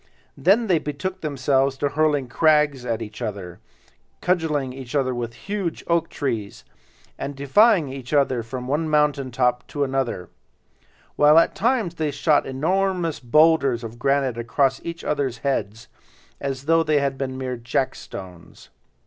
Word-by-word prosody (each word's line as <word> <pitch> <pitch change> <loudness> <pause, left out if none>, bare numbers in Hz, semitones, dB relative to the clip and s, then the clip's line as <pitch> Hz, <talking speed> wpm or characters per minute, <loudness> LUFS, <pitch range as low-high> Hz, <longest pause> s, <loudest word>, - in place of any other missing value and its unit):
Then 195 - +3
they 180 -6 +2
betook 180 +7 -5
themselves 135 -2 +1
to 145 +1 0
hurling 145 -2 +1
crags 145 0 +2
at 115 -1 -1
each 110 +2 -10
other, 100 -6 -5 0.6
cudgeling 160 -7 0
with 130 -2 -2
huge 195 +1 -4
oak 170 -1 +1
trees, 110 -7 -4 0.5
and 140 - -4
defying 150 - +3
each 130 -2 -8
other 135 -4 +2
from 125 +2 -6
one 155 +4 0
mountain 150 -3 +2
top 125 -1 0
to 145 - -2
another; 130 -9 -2 0.9
while 150 +2 +6
at 165 - +5
times 230 -6 0
they 160 -3 -2
shot 145 +1 +2
enormous 175 +4 0
boulders 140 -1 +3
of 115 +1 -8
granite 135 -2 +1
across 135 +3 +1
at - - -12
each 170 0 -6
other's 135 -5 -1
heads, 115 -4 -2 0.5
as 135 -1 -4
though 165 +2 +3
they 155 -2 +2
had 140 -1 -1
been 130 -1 -4
mere 130 -1 -3
jackstones. 105 -7 -5
140 Hz, 145 wpm, -23 LUFS, 125-155 Hz, 0.9 s, while